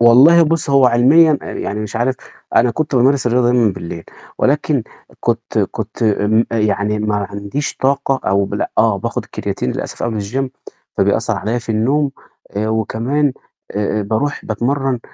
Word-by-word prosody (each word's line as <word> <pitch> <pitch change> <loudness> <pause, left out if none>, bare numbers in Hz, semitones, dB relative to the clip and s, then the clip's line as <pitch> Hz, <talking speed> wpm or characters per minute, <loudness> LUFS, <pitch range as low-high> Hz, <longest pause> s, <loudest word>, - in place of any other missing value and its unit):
والله 130 +9 +7
بُص، 160 -2 0
هو 135 -2 +5
علميًا 145 +6 +5
يعني 105 +2 -4
مش 105 +1 -5
عارف 130 +3 0 0.4
أنا 120 +1 +4
كنت 150 +3 -2
بامارس 130 +1 +3
الرياضة 120 0 +3
دايمًا 120 -4 +3
بالليل 85 -2 -7 0.3
ولكن 145 -1 +1 0.4
كنت - - -1
كنت - - -2
م 110 +1 +3
يعني 105 -1 0
ما 105 -1 -1
عنديش 100 +8 -4
طاقة 135 0 0
أو 100 0 +3
بال - - -2
آه، 110 -3 +3
باخد - - -4
كرياتين 65 - -3
للأسف - - -5
قبل 110 -3 -1
الgym 130 +7 -2 0.5
فبيأثر - - +1
عليَّ 115 +5 -2
في 115 - -16
النوم 135 +7 +1 0.5
آآ 110 +1 0
وكمان 120 +6 0 0.4
آآ 105 +1 -1
بارُوح 110 +8 -2
باتمرن 130 +3 -1
120 Hz, 150 wpm, -17 LUFS, 105-135 Hz, 0.5 s, والله